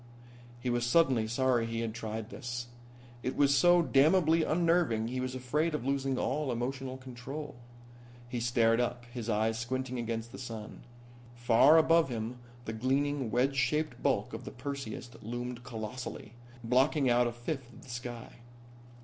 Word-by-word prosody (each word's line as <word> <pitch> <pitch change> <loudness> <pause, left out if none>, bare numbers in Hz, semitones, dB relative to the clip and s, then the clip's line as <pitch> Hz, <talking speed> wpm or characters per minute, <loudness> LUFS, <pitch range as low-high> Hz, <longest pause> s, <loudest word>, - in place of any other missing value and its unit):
He 125 0 -2
was 120 0 0
suddenly 120 -3 +3
sorry 120 0 +1
he 115 0 -2
had 115 -1 -3
tried 110 0 -5
this. 120 0 -5 0.6
It 130 - -3
was 140 -1 +4
so 175 +3 +5
damnably 160 +3 +4
unnerving 165 -9 +2
he 130 +1 -3
was 130 0 -3
afraid 150 +6 0
of 140 - -4
losing 135 -1 0
all 140 +1 -1
emotional 130 +2 -3
control. 130 +4 -7 0.7
He 120 0 -3
stared 115 -1 +3
up, 120 0 -1
his 120 -2 -5
eyes 110 +1 +1
squinting 130 +1 -3
against 115 0 -3
the - - -9
sun. 115 -4 -7 0.5
Far 120 +6 +6
above 165 -1 +5
him 120 +1 -4 0.3
the 110 - -4
gleaming, 135 +2 0
wedge 130 +5 +1
shaped 150 +4 0
bulk - - 0
of - - -6
the - - -6
Perseus 130 -2 -6
loomed 120 +2 -5
colossally, 110 0 -6 0.3
blocking 130 +4 +3
out 120 0 +4
a - - -1
fifth 120 +1 -5
of - - -15
the - - -15
sky. 120 0 -7
125 Hz, 160 wpm, -31 LUFS, 120-140 Hz, 0.7 s, Far